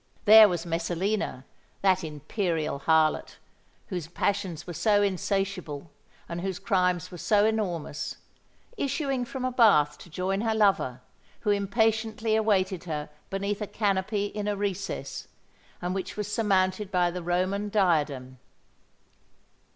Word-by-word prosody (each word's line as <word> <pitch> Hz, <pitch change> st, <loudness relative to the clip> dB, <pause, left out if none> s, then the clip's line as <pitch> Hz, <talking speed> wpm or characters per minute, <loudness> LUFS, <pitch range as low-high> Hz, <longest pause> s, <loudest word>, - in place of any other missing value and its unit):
There 215 Hz, 0 st, +10 dB
was 175 Hz, -1 st, -2 dB
Messalina—that 180 Hz, +1 st, -2 dB
imperial 155 Hz, 0 st, -2 dB
harlot, 160 Hz, +1 st, +2 dB, 0.5 s
whose 180 Hz, -6 st, -4 dB
passions 185 Hz, -1 st, -2 dB
were 175 Hz, -, -6 dB
so 205 Hz, +4 st, +3 dB
insatiable 190 Hz, -6 st, -2 dB, 0.4 s
and 170 Hz, 0 st, -5 dB
whose 190 Hz, -1 st, -3 dB
crimes 180 Hz, -3 st, 0 dB
were 175 Hz, -, -8 dB
so 205 Hz, +3 st, +3 dB
enormous,—issuing 235 Hz, -, -3 dB
from 255 Hz, +1 st, -5 dB
a 255 Hz, -, 0 dB
bath 150 Hz, -, +4 dB
to -, -, -13 dB
join 190 Hz, +4 st, -1 dB
her 225 Hz, -1 st, 0 dB
lover, 195 Hz, -, +2 dB, 0.4 s
who 210 Hz, -, +1 dB
impatiently 220 Hz, +2 st, +1 dB
awaited 190 Hz, -4 st, +1 dB
her 150 Hz, -3 st, -4 dB, 0.2 s
beneath 200 Hz, +2 st, -2 dB
a 210 Hz, -, -2 dB
canopy 200 Hz, 0 st, 0 dB
in 205 Hz, 0 st, -4 dB
a 205 Hz, -1 st, -1 dB
recess, 195 Hz, -1 st, -4 dB, 0.6 s
and 180 Hz, +1 st, -1 dB
which 190 Hz, +1 st, -4 dB
was 210 Hz, 0 st, -3 dB
surmounted 195 Hz, -2 st, +1 dB
by 180 Hz, -2 st, +2 dB
the 180 Hz, +1 st, -5 dB
Roman 185 Hz, +4 st, -1 dB
diadem. 150 Hz, -, 0 dB
195 Hz, 125 wpm, -27 LUFS, 170-210 Hz, 0.6 s, There